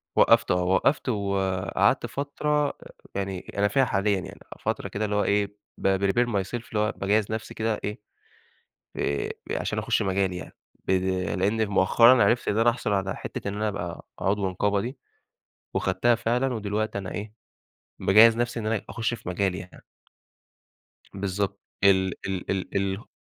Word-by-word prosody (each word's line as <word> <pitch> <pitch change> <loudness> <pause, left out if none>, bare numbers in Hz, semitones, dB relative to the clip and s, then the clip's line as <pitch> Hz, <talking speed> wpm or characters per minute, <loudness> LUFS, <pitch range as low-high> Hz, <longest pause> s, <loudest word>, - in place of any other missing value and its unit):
وقّفته - - +5
آه، 90 0 +1
وقّفت 95 +10 +2
وقعدت 100 -4 +1
فترة 145 +1 -1 0.4
يعني 95 -1 -2 0.2
أنا 100 0 +3
فيها 135 +6 +3
حاليًا، 100 -2 +1
يعني 90 - -9 0.2
فترة - - -2
كده 105 +2 -2
اللي 105 0 -1
هو 105 - +2
إيه، 100 0 0 0.3
بprepare 100 +5 +2
myself، 100 -2 -2 0.2
اللي 105 - 0
هو 105 +1 +2
باجهز 105 +2 +1
نفسي 110 0 -4
كده 110 -1 -1
إيه، 105 +1 -4 1.0
آآ 70 -1 -1 0.2
عشان - - -1
أخش - - +1
مجالي 95 -1 0
يعني، 90 - -9 0.3
ب - - 0 0.5
لإني 110 +4 +2
مؤخرًا 115 +5 +5
عرفت 120 0 +2
إن 105 - +1
أنا 115 +1 +5
أحصل 115 -3 -2
على 95 -1 -1
حتة - - -6
إن 100 - -3
أنا 105 +1 -1
أبقى 85 -5 -5
عضو 100 0 0
نقابة 100 +2 0
دي، 125 +5 -5 0.8
وخدتها 100 +6 +2
فعلًا، 120 +3 0
ودلوقتي 110 -1 -2
أنا 95 -2 -5
إيه، 105 +1 -6 0.7
باجهز 110 +3 +6
نفسي 120 0 -1
إن 110 - -4
أنا 110 -1 0
أخش 115 +1 -2
في 115 - -9
مجالي 95 0 0
يعني. 90 -1 -11 1.3
بالضبط 100 0 -2 0.2
ال 95 -2 +4
ال 95 -2 -3
ال 95 -1 -3
ال 100 +2 -2
100 Hz, 160 wpm, -26 LUFS, 95-115 Hz, 1.3 s, باجهز